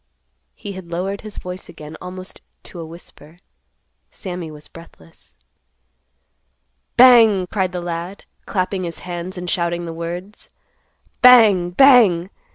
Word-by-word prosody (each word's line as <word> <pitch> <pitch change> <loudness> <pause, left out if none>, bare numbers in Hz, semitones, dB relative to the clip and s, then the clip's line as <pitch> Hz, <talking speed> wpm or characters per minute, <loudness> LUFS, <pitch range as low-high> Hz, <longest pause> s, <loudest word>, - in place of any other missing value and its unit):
He 205 - -8
had 185 -3 -10
lowered 190 +4 -4
his 215 -1 -9
voice 180 0 -8
again 150 +1 -11
almost 185 +1 -8 0.2
to 175 - -11
a 165 - -6
whisper. 165 -1 -15 0.7
Sammy 180 -3 -7
was 150 -1 -10
breathless. 85 - -17 1.6
"Bang!" 230 -6 +6
cried 185 -1 -2
the 180 -1 -5
lad, 175 +3 -6 0.2
clapping 185 0 -2
his 170 -1 -6
hands 180 +1 -6
and 180 0 -6
shouting 170 -1 -1
the 165 - -6
words; 175 +5 -7 0.7
"Bang! 220 -8 +6
Bang! 200 -5 +5
180 Hz, 125 wpm, -19 LUFS, 170-195 Hz, 1.6 s, Bang